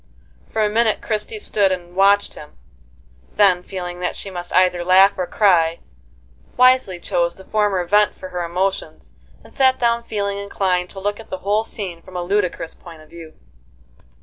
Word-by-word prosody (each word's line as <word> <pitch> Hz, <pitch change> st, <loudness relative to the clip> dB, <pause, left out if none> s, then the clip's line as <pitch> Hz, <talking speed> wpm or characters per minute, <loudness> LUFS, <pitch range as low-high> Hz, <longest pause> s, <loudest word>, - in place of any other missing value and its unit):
For 220 Hz, -1 st, +1 dB
a -, -, +2 dB
minute 220 Hz, 0 st, +1 dB
Christie 220 Hz, -, -3 dB
stood 205 Hz, -, +1 dB
and 175 Hz, -1 st, -5 dB
watched 200 Hz, +1 st, +3 dB
him, 150 Hz, -, -13 dB, 0.8 s
then, 195 Hz, -4 st, +4 dB
feeling 180 Hz, -1 st, -7 dB
that 180 Hz, 0 st, -2 dB
she 195 Hz, -, -7 dB
must 175 Hz, -1 st, -7 dB
either 180 Hz, -1 st, +2 dB
laugh 190 Hz, +2 st, +6 dB
or 180 Hz, -1 st, -3 dB
cry, 170 Hz, -4 st, +3 dB, 0.8 s
wisely 255 Hz, -7 st, +4 dB
chose 170 Hz, 0 st, -1 dB
the 190 Hz, -, -15 dB
former 205 Hz, -4 st, 0 dB
vent 205 Hz, +3 st, +3 dB
for 185 Hz, -, -9 dB
her 180 Hz, -1 st, -4 dB
emotions, 185 Hz, +3 st, -3 dB, 0.3 s
and -, -, -17 dB
sat 260 Hz, -1 st, +3 dB
down 235 Hz, -1 st, +1 dB
feeling 200 Hz, -3 st, -3 dB
inclined 185 Hz, -3 st, -1 dB
to 195 Hz, -, -8 dB
look 205 Hz, +2 st, -3 dB
at 225 Hz, -, -12 dB
the 185 Hz, -, -4 dB
whole 210 Hz, +2 st, +2 dB
scene 185 Hz, -7 st, -7 dB
from 185 Hz, +2 st, -15 dB
a 175 Hz, -, -2 dB
ludicrous 180 Hz, -3 st, -1 dB
point 165 Hz, -3 st, -14 dB
of 155 Hz, -, -22 dB
view. 165 Hz, -2 st, -12 dB
190 Hz, 175 wpm, -20 LUFS, 175-210 Hz, 0.8 s, laugh